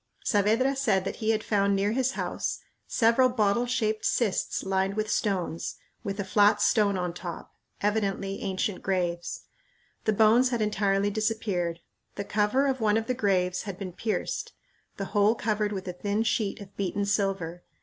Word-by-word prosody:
Saavedra 225 Hz, +6 st, +2 dB
said 215 Hz, -9 st, +1 dB
that -, -, -4 dB
he 220 Hz, -, -2 dB
had 220 Hz, -1 st, +2 dB
found 200 Hz, -1 st, +2 dB
near 200 Hz, +1 st, +1 dB
his 260 Hz, +2 st, +1 dB
house -, -, -2 dB, 0.3 s
several 235 Hz, +3 st, +4 dB
bottle 235 Hz, 0 st, +1 dB
shaped 220 Hz, -3 st, 0 dB
cists 220 Hz, -6 st, 0 dB
lined 190 Hz, +1 st, 0 dB
with 215 Hz, 0 st, -1 dB
stones, 185 Hz, -6 st, -1 dB, 0.3 s
with 200 Hz, 0 st, -4 dB
a -, -, 0 dB
flat 205 Hz, +2 st, +4 dB
stone 205 Hz, -3 st, +3 dB
on 180 Hz, -1 st, -2 dB
top 175 Hz, -1 st, -7 dB, 0.3 s
evidently 200 Hz, -2 st, -1 dB
ancient 190 Hz, +1 st, -2 dB
graves. 175 Hz, -2 st, -2 dB, 0.6 s
The 215 Hz, -, +3 dB
bones 225 Hz, +4 st, +5 dB
had 240 Hz, -2 st, -1 dB
entirely 205 Hz, -1 st, +1 dB
disappeared. 200 Hz, -6 st, -1 dB, 0.3 s
The 200 Hz, -, -3 dB
cover 210 Hz, +7 st, +1 dB
of 265 Hz, -3 st, 0 dB
one 215 Hz, 0 st, +3 dB
of 225 Hz, -, -1 dB
the 255 Hz, -, 0 dB
graves 185 Hz, -6 st, +1 dB
had 185 Hz, -, -5 dB
been 185 Hz, -3 st, -6 dB
pierced; 215 Hz, +4 st, -3 dB, 0.4 s
the 195 Hz, -, -3 dB
hole 210 Hz, +2 st, +4 dB
covered 210 Hz, -2 st, 0 dB
with 190 Hz, -2 st, -5 dB
a 180 Hz, -, -3 dB
thin 205 Hz, +4 st, -1 dB
sheet 215 Hz, -2 st, 0 dB
of 200 Hz, 0 st, -12 dB
beaten 200 Hz, +1 st, -1 dB
silver. 195 Hz, -4 st, -1 dB
205 Hz, 170 wpm, -27 LUFS, 195-220 Hz, 0.6 s, bones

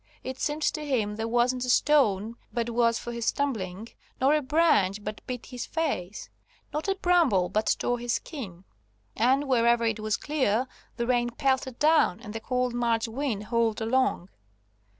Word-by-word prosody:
It 260 Hz, 0 st, -6 dB
seemed 300 Hz, +1 st, -2 dB
to 305 Hz, 0 st, 0 dB
him 225 Hz, -8 st, -1 dB
there 225 Hz, +1 st, -3 dB
wasn't 245 Hz, +2 st, +1 dB
a 250 Hz, -, -3 dB
stone 230 Hz, -6 st, +3 dB, 0.2 s
but 235 Hz, -1 st, -2 dB
was 230 Hz, 0 st, +2 dB
for 240 Hz, -, -6 dB
his 235 Hz, -1 st, -4 dB
stumbling, 220 Hz, -7 st, -2 dB, 0.3 s
not 275 Hz, +3 st, +4 dB
a 305 Hz, -, +1 dB
branch 255 Hz, -, +2 dB
but 215 Hz, +1 st, -6 dB
beat 250 Hz, -2 st, -5 dB
his 250 Hz, -2 st, -6 dB
face, 215 Hz, -, -3 dB, 0.5 s
not 300 Hz, +4 st, -3 dB
a 390 Hz, -, +1 dB
bramble 335 Hz, -, +3 dB
but 215 Hz, +1 st, +1 dB
tore 245 Hz, 0 st, -1 dB
his 240 Hz, -1 st, -1 dB
skin. 195 Hz, -, -6 dB, 0.5 s
And 265 Hz, +5 st, +2 dB
wherever 235 Hz, -2 st, +3 dB
it 225 Hz, -1 st, 0 dB
was 215 Hz, 0 st, -1 dB
clear 260 Hz, -6 st, 0 dB, 0.3 s
the 235 Hz, -, -1 dB
rain 240 Hz, -1 st, +1 dB
pelted 260 Hz, 0 st, -1 dB
down 305 Hz, -, +3 dB
and 215 Hz, -3 st, -9 dB
the 225 Hz, -, -4 dB
cold 250 Hz, +1 st, -1 dB
March 235 Hz, -1 st, 0 dB
wind 230 Hz, -3 st, -3 dB
howled 230 Hz, 0 st, 0 dB
along. 230 Hz, -5 st, 0 dB
240 Hz, 170 wpm, -27 LUFS, 220-270 Hz, 0.5 s, not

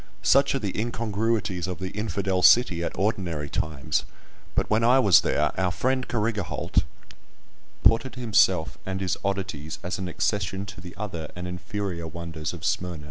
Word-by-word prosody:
Such 140 Hz, 0 st, +4 dB
are -, -, +1 dB
the 100 Hz, -5 st, -3 dB
incongruities 110 Hz, -4 st, -1 dB
of 90 Hz, -, -4 dB
the 95 Hz, 0 st, -5 dB
"infidel 100 Hz, -3 st, -1 dB
city" 90 Hz, -6 st, +5 dB
at -, -, -4 dB
ordinary 85 Hz, -7 st, -1 dB
times; 75 Hz, -4 st, -1 dB, 0.5 s
but -, -, +1 dB
when 110 Hz, +2 st, +2 dB
I 125 Hz, +3 st, +6 dB
was 100 Hz, -9 st, +6 dB
there, 75 Hz, +1 st, +1 dB
our 95 Hz, -1 st, +2 dB
friend 130 Hz, +8 st, 0 dB
Carrigaholt 110 Hz, -5 st, -2 dB
had -, -, +5 dB, 1.0 s
imported 115 Hz, +1 st, +3 dB
himself 100 Hz, -8 st, +2 dB
and 95 Hz, 0 st, -3 dB
his 95 Hz, -2 st, 0 dB
oddities 95 Hz, -6 st, -3 dB
as 90 Hz, +2 st, -3 dB
an 95 Hz, -, -3 dB
accession 95 Hz, +2 st, -1 dB
to 95 Hz, -, -9 dB
the 90 Hz, -1 st, -10 dB
other 85 Hz, -7 st, -5 dB
and 90 Hz, 0 st, -5 dB
inferior 90 Hz, -1 st, -4 dB
wonders 80 Hz, -2 st, -5 dB
of 80 Hz, -3 st, -7 dB
Smyrna. 90 Hz, -3 st, -1 dB
95 Hz, 165 wpm, -26 LUFS, 85-110 Hz, 1.0 s, I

